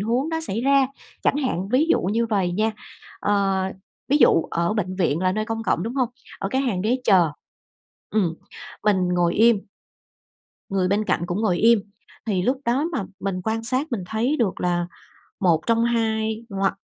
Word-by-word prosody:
huống 240 +8 0
nó 320 0 -2
xảy 230 -8 -3
ra, 275 0 +4 0.4
chẳng - - +2
hạn, 200 - -1
ví 265 +7 +3
dụ - - +4
như 225 +6 0
vầy 195 -5 0
nha. 215 +4 +1 0.5
Ờ, 195 -2 +1 0.5
ví 280 - +4
dụ 215 - +5
ở 170 +3 0
bệnh 185 -3 -2
viện 165 -4 +1
là 185 0 +2
nơi 215 +2 -1
công 225 0 -3
cộng, 175 - 0
đúng 230 +6 -4
hông? 255 -3 +1 0.3
Ở 195 - -2
cái 260 +5 0
hàng 235 -9 -1
ghế 250 +4 +1
chờ, 185 -5 +5 0.8
ừm, 185 -7 +1 0.5
mình 190 -4 +2
ngồi 175 -1 +2
im 230 0 +5 1.1
người 190 -2 +1
bên 205 +3 +1
cạnh - - 0
cũng 175 +4 -2
ngồi 185 -6 +1
im. 230 +1 +5 0.5
Thì 195 -5 0
lúc 255 +8 +1
đó 250 +6 +1
mà 210 - -1 0.2
mình 195 -2 -2
quan 225 +1 -1
sát, 255 +6 0
mình 225 - -1
thấy 235 +9 0
được 210 -6 0
là 175 -1 0 0.5
một 170 -5 +3
trong 230 0 +3
hai, 220 -1 0
ngoặc 195 -1 0
215 Hz, 190 wpm, -23 LUFS, 185-235 Hz, 1.1 s, dụ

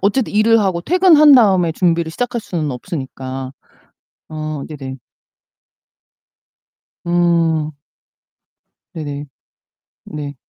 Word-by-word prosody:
어쨌든 210 +5 0
일을 220 +2 +4
하고 185 -4 0
퇴근한 320 - +5
다음에 190 -9 +4
준비를 170 -1 0
시작할 245 +5 -3
수는 160 -8 -3
없으니까. 130 -1 -6 0.8
어 155 -2 -5
네네. 135 -4 -8 2.1
음. 165 -3 +1 1.2
네네. 145 -2 -6 0.8
네. 145 -2 -7
165 Hz, 185 characters per minute, -17 LUFS, 150-205 Hz, 2.1 s, 퇴근한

